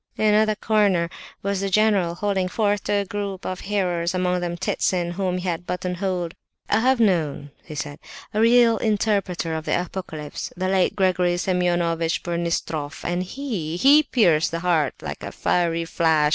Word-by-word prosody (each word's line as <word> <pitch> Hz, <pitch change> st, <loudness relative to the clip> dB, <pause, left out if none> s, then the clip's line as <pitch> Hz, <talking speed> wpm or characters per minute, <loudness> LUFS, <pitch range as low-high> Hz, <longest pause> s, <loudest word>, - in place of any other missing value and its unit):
In 215 Hz, -1 st, +3 dB
another 215 Hz, 0 st, +3 dB
corner 200 Hz, -6 st, +2 dB, 0.3 s
was 200 Hz, -1 st, -1 dB
the 195 Hz, -, -1 dB
general, 195 Hz, -4 st, +2 dB
holding 195 Hz, -1 st, 0 dB
forth 205 Hz, +1 st, 0 dB
to -, -, 0 dB
a 200 Hz, -1 st, +1 dB
group 200 Hz, -1 st, -5 dB
of 185 Hz, -1 st, -3 dB
hearers, 180 Hz, -3 st, -1 dB
among 180 Hz, 0 st, 0 dB
them 175 Hz, -1 st, -3 dB
Ptitsin, 175 Hz, 0 st, 0 dB
whom 185 Hz, 0 st, -1 dB
he 180 Hz, +1 st, -4 dB
had 175 Hz, 0 st, -3 dB
buttonholed. 180 Hz, -1 st, -2 dB, 0.3 s
"I -, -, +2 dB
have 255 Hz, +2 st, +3 dB
known," 160 Hz, -9 st, +1 dB, 0.2 s
said 150 Hz, 0 st, -5 dB, 0.3 s
he, 210 Hz, -, 0 dB
"a -, -, +4 dB
real 230 Hz, 0 st, +5 dB
interpreter 200 Hz, -6 st, 0 dB
of 160 Hz, 0 st, -4 dB
the -, -, +1 dB
Apocalypse, 165 Hz, -5 st, -6 dB
the 185 Hz, +1 st, -1 dB
late 190 Hz, -1 st, +2 dB
Gregory 180 Hz, -2 st, +2 dB
Semeonovitch 175 Hz, -2 st, 0 dB
Burmistroff, 170 Hz, -4 st, -3 dB
and 175 Hz, +1 st, 0 dB
he—he 235 Hz, -, +2 dB
pierced 175 Hz, -, +3 dB
the 165 Hz, 0 st, -4 dB
heart 165 Hz, -6 st, +1 dB
like -, -, -6 dB
a -, -, -6 dB
fiery 170 Hz, -1 st, 0 dB
flash! 160 Hz, -2 st, +2 dB
180 Hz, 165 wpm, -23 LUFS, 170-205 Hz, 0.3 s, real